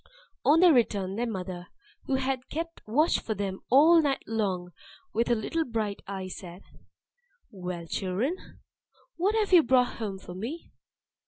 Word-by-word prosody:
On 305 +4 +5
their 355 -3 +7
return, 200 -6 +1
their 235 +2 -1
mother, 180 -3 -5 0.4
who 270 - 0
had 265 -1 -2
kept 330 +2 -5
watch 300 +10 +3
for 220 - -4
them 195 -1 -3
all 320 +6 +7
night 280 -3 0
long 190 -5 -2 0.4
with 230 +1 +1
her 240 - +3
little 320 +9 -1
bright 220 -6 -3
eye, 190 -1 -5
said, 180 0 -9 0.9
"Well, 180 -3 -6
children, 195 - -1 0.8
what 395 +5 +1
have 425 -3 +1
you 350 - +9
brought 250 -2 +2
home 205 -4 -4
for 185 -1 -10
me?" 235 - -6
225 Hz, 155 wpm, -28 LUFS, 190-290 Hz, 0.9 s, you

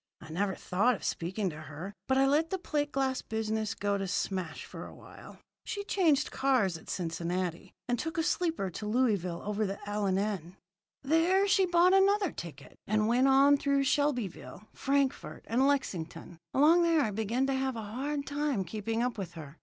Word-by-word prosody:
I 160 - -11
never 190 +3 -1
thought 205 +7 +1
of - - -11
speaking 185 +3 -2
to 150 0 -9
her, 155 +6 -8
but 265 - +2
I 270 - +5
let 300 +4 +2
the 380 - -1
plate 295 -5 -2
glass 265 -1 0
business 220 -1 -2
go 200 0 -1
to 195 - -2
smash 185 -3 -3
for - - -8
a - - -12
while. - - -13 0.3
"She 405 -3 -4
changed 325 -8 +2
cars 255 -9 +2
at 160 - -11
Cincinnati, 175 0 -3 0.2
and 245 -1 0
took 320 +1 -4
a 325 - +2
sleeper 325 - 0
to 210 +5 -6
Louisville 210 -7 0
over 210 +1 -1
the 195 +1 -4
L. 205 0 -1
and 190 0 +1
N. 195 -4 -3 0.5
There 340 +7 +3
she 390 -1 +4
bought 350 +1 +4
another 390 0 +4
ticket, 155 -5 -10
and 215 +1 +2
went 245 +3 +3
on 275 +2 +6
through 280 0 +1
Shelbyville, 255 - -1
Frankfort, 275 -1 -1
and 255 +4 +2
Lexington. 170 - -2
Along 315 +5 +5
there 335 -2 +3
I 220 - 0
began 220 +5 0
to 270 - 0
have 265 -1 -1
a 225 - -5
hard 280 +7 -3
time 285 -7 -1
keeping 225 +5 -2
up 245 -3 -2
with 180 -4 -5
her. 155 -2 -10
235 Hz, 190 wpm, -30 LUFS, 190-285 Hz, 0.5 s, on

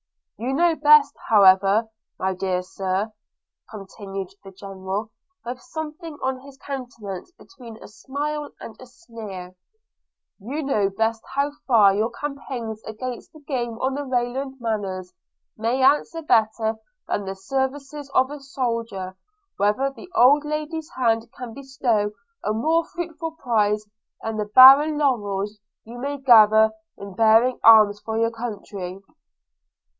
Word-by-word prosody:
– - - -6
You 265 +2 -1
know 340 +2 +3
best, 295 -1 +5 0.2
however, 200 +1 +5 0.3
my 190 0 -1
dear 185 -1 -2
Sir,' 190 +3 -3 0.6
continued 195 -2 -7
the 195 - -10
General, 195 +2 -6 0.3
with 245 +1 -6
something 315 +1 -7
on 260 0 -1
his 275 0 -14
countenance 245 - -7
between 235 - -13
a - - -10
smile 290 +6 -5
and 220 - -9
a 255 - -12
sneer 220 - -10 0.4
– - - -61
'you 280 +9 -4
know 210 -8 +1
best 225 +3 -1
how 280 +1 +1 0.2
far 215 -6 +6
your 215 +3 0
campaigns 245 -4 -6
against 240 +3 -7
the 310 - -16
game 240 -5 -3
on 260 +1 0
the 285 - -3
Rayland 260 +1 -2
manors 195 -6 -3 0.4
may 235 +4 0
answer 295 +4 +2
better 220 -4 +1 0.3
than 205 - -2
the 195 0 -5
services 270 +7 -4
of 260 +2 +3
a 295 - -7
soldier, 230 -7 -3
or 190 - -18 0.4
whether 210 +7 +1
the 315 +6 -13
old 285 +5 +6
lady's 305 +1 -4
hands 230 -2 +1
can 245 -3 -7
bestow 255 -6 -1 0.3
a - - 0
more 315 +10 +1
fruitful 330 -2 -6
prize 215 -7 0 0.4
than 225 -1 -3
the 210 - -1
barren 270 +7 +8
laurels 210 -7 -1 0.3
you 235 +2 -10
may 285 +3 -3
gather 220 -4 +6 0.3
in 200 -1 -9
bearing 225 +4 +4
arms 215 -2 +7
for 220 +1 -4
your 230 0 +1
country.' 205 -5 -6
230 Hz, 140 wpm, -23 LUFS, 210-275 Hz, 0.6 s, barren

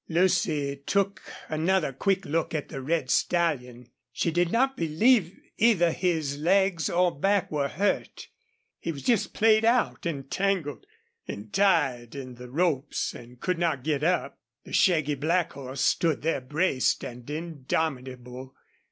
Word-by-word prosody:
Lucy 165 -5 +1
took 200 0 +1 0.3
another 160 -1 0
quick 195 +7 0
look 160 +2 -1
at 150 - -3
the 135 - -6
red 140 -2 -1
stallion. 125 -9 0 0.2
She 170 - -1
did 175 +1 +1
not 265 +3 +2
believe 175 +4 +2 0.2
either 195 -7 +4
his 160 -6 -1
legs 180 -1 +2
or 180 0 +2
back 195 +6 +1
were 145 -2 0
hurt. 195 +9 -2 0.5
He 170 - -3
was 140 -4 -8
just 235 -5 +1
played 220 0 +4
out 235 -5 +2
and 140 -4 -5
tangled 190 - -1 0.4
and 100 +1 -7
tied 140 - +2
in 130 -2 -7
the 125 0 -11
ropes, 150 -1 0
and 120 +1 -12
could 180 +2 -1
not 160 -7 0
get 150 -1 -1
up. 180 +3 0 0.2
The - - -12
shaggy 155 -6 +3
black 165 +5 0
horse 135 -1 -6
stood 165 -5 +1
there 160 -4 0
braced 145 +1 0
and 120 +1 -9
indomitable. 135 -5 -4
160 Hz, 145 wpm, -27 LUFS, 135-180 Hz, 0.5 s, either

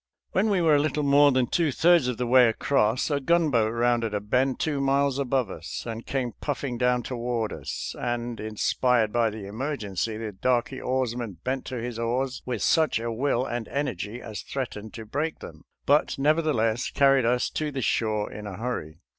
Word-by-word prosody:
When 205 +4 +2
we 195 -3 +2
were 160 -2 +5
a - - +4
little 150 0 -1
more 145 +1 +5
than 130 -1 +2
two 160 +3 +1
thirds 170 -2 +4
of 125 -2 -2
the 125 - -1
way 125 0 +6
across, 115 +2 +1
a 145 - +1
gunboat 140 -8 +2
rounded 115 -2 +1
a - - +1
bend 125 +6 0
two 145 -3 -1
miles 140 0 +2
above 130 -6 0
us, 85 - -6
and 115 -1 -6
came 130 -3 -1
puffing 135 -4 -3
down 125 -1 +2
toward 120 -3 -2
us, - - -5
and, 120 -1 -3
inspired 110 +1 +1
by 120 -1 +3
the 105 -1 -7
emergency, 110 -2 -3
the 110 -1 -5
darky 125 +6 0
oarsman 120 -6 -2
bent 130 0 -2
to 130 - -5
his 120 0 -5
oars 125 +3 -1
with 120 -4 -2
such 160 -7 +3
a 115 0 -3
will 125 +1 0
and 120 -2 -4
energy 120 -5 -3
as 110 -4 -7
threatened 110 -5 -5
to 115 -2 -7
break 150 +8 -2
them, - - -11 0.2
but 145 +2 +3
nevertheless 135 -6 +1
carried 135 -2 +4
us 125 +1 +2
to 155 -1 -2
the 135 -3 -3
shore 110 -2 0
in 105 0 -7
a 95 -3 -7
hurry. 95 -9 -4
125 Hz, 190 wpm, -26 LUFS, 115-140 Hz, 0.2 s, way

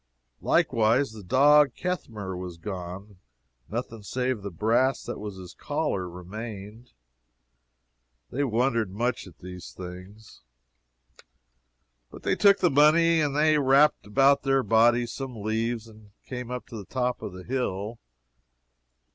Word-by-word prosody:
Likewise 115 +4 +2
the 110 -1 -10
dog 140 +6 +5
Ketmehr 110 - -4
was 90 -1 -7
gone, 90 0 -6
and 100 -3 -20 0.5
nothing 115 0 -5
save 125 +2 -2
the 100 - -5
brass 115 +8 +1
that - - -6
was 105 -1 -6
upon 95 - -10
his 90 - -11
collar 90 -2 -2
remained. 105 +5 -9 1.4
They 140 +4 -1
wondered 115 -3 +1
much 115 +3 -2
at 85 -4 -15
these 90 0 -9
things. 95 +4 -11 1.7
But - - -13
they - - +1
took 200 -1 +5
the 180 -3 +4
money, 160 +3 +5
and 145 -2 0
they 155 0 +4
wrapped 140 -2 +4
about 135 +6 +4
their 135 -1 +2
bodies 120 +2 +3
some 125 -6 -6
leaves, 115 +1 -1
and 110 -1 -16 0.2
came 125 -2 -6
up 125 0 -5
to 115 - -7
the 100 - -8
top 125 +1 -2
of 95 - -6
the 90 0 -9
hill. 115 -3 -3
115 Hz, 140 wpm, -26 LUFS, 100-135 Hz, 1.7 s, dog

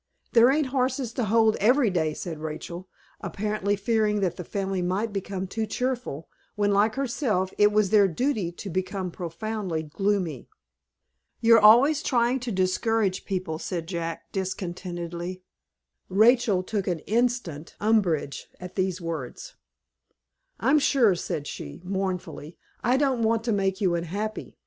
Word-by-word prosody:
"There 235 +1 +6
ain't 285 0 +1
horses 255 -2 0
to 245 - -1
hold 220 +1 +3
every 240 +1 +3
day," 160 -4 0
said 165 -4 -6
Rachel, 170 +4 -6 0.3
apparently 205 -1 -1
fearing 210 0 +1
that 180 -3 0
the 180 - -6
family 195 +1 -2
might 195 +5 -1
become 195 -1 -3
too 220 +4 -3
cheerful, 245 - -3 0.3
when, 205 -1 +1
like 210 +2 +3
herself, 240 -8 -1
it 210 0 +6
was 210 -2 +2
their 205 -2 +6
duty 210 - -1
to 195 +3 -7
become 185 +1 -2
profoundly 180 0 -4
gloomy. 175 - -2 0.9
"You're 230 0 +6
always 255 +8 +6
trying' 245 -1 +1
to 245 -1 -4
discourage 190 +1 0
people," 180 -5 -3
said 170 -2 -4
Jack, 165 -1 -5
discontentedly. 180 -1 -4 0.7
Rachel 215 -1 +4
took 200 0 -3
instant 190 -3 -1
umbrage 195 -10 +1
at 180 0 -8
these 185 -1 -1
words. 160 -7 -6 1.1
"I'm 270 +6 +4
sure," 265 -8 +4
said 155 -4 -4
she; 70 - -7
mournfully, 180 -5 -4 0.3
"I 245 +3 +3
don't 265 -4 +1
want 225 0 +2
to 235 - 0
make 195 -2 0
you 185 -4 +2
unhappy. 200 +6 -4
195 Hz, 140 wpm, -26 LUFS, 180-225 Hz, 1.1 s, There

